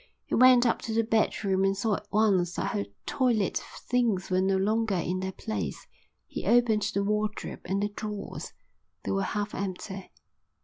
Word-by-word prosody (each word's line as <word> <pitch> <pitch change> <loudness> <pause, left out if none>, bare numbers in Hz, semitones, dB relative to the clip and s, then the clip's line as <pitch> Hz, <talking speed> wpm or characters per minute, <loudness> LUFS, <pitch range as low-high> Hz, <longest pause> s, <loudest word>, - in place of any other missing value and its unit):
He - - -7
went 255 0 +7
up 235 - +2
to 225 - -4
the 230 - +3
bedroom 205 -3 +1
and 195 0 +2
saw 215 +2 +1
at 210 - -12
once 195 -5 +2
that - - -1
her 100 - -1 0.2
toilet 235 -7 +1 0.3
things 230 -7 +1
were 185 0 +3
no 190 0 +2
longer 215 +1 +1
in 180 +1 -1
their 190 0 -3
place. 220 +3 -4 0.4
He - - -6
opened 235 -3 +4
the 200 - +2
wardrobe 210 +1 -2
and 195 +3 0
the 205 - 0
drawers. 210 -1 -6 0.5
They - - -2
were 195 - +1
half 205 +1 -2
empty. 190 0 -5
205 Hz, 175 wpm, -28 LUFS, 190-220 Hz, 0.5 s, went